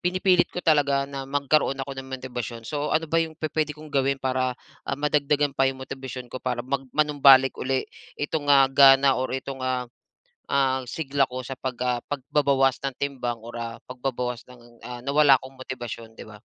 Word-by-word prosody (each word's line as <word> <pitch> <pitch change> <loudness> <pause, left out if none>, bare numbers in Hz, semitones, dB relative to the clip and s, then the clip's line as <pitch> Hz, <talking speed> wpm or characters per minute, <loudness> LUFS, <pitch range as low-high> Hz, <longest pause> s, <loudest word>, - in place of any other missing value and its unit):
pinipilit 185 0 +3
ko 180 - -7
talaga 140 -3 +3
na 135 -1 -6
magkaroon 140 0 +1
ako 140 - -7
ng 130 - -7
motibasyon. 125 -3 -6
So, 150 0 -2
ano 160 +1 +2
ba 165 +2 +2
yung 160 -1 -3
pupuwede 155 -1 -2
kong 155 0 -12
gawin 135 0 +1
para, 130 -1 -1 0.3
ah, 140 - -1
madagdagan 145 -1 +1
pa 135 0 +2
yung 130 0 -5
motibasyon 130 -2 -8
ko, 130 - -5
para 125 -1 -3
mag 135 +1 -1 0.2
manumbalik 140 -3 +6
uli 130 0 0 0.3
itong, 145 0 -3
ah, 140 -1 +7
gana 135 0 +6
or 130 - -2
ito, 135 +1 -5
ah, 130 -1 -1 0.7
ah, 130 -2 +1
sigla 140 0 0
ko 130 0 -6
sa 130 +1 -7
pag 130 -1 -3
ah, 125 -1 +1
pagbabawas 135 -1 +1
ng 135 - -3
timbang 125 -5 -3
or, 120 +1 -8
ah, 115 0 -5
pagbabawas 125 -1 -4
ng, 120 -1 -17
ah, 120 -1 -7
nawala 140 0 +5
kong 130 0 -12
motibasyon, 120 -3 -7
'di - - -11
ba? 105 - -12
135 Hz, 185 wpm, -25 LUFS, 125-145 Hz, 0.7 s, ah